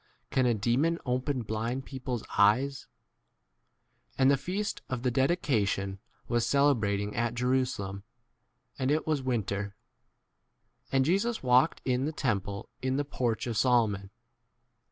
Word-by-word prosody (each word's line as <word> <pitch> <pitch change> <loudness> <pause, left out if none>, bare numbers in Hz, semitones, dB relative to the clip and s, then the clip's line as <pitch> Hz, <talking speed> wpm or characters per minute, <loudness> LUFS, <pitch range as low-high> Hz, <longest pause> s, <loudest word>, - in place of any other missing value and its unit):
Can 130 -1 +3
a 120 - +3
demon 125 +11 +1
open 130 +1 -1
blind 115 +5 -3
people's 130 -3 -4
22 - - -13
eyes? 130 +7 +3 1.3
And 135 0 +5
the - - +5
feast 195 +8 -3
of 125 -2 -3
the 125 - +2
dedi 135 +8 +2
cation 100 - 0 0.3
was 120 -1 +1
celebrating 110 -8 +2
at 120 0 0
Jerusa 125 +1 +1
23 100 - -4
lem, 100 +1 -7 0.8
and 130 0 0
it 155 +2 +1
was 155 -3 0
winter. 105 -5 -2 1.2
And 135 -1 +3
Jesus 200 - +1
walked 130 +5 +3
in 130 +1 +1
the 155 - -1
temple 100 -9 -2
in 130 +1 0
the 145 - 0
porch 125 -5 -1
24 120 - -2
of 110 - -3
Solomon. 110 -5 +2
125 Hz, 150 wpm, -29 LUFS, 110-135 Hz, 1.3 s, And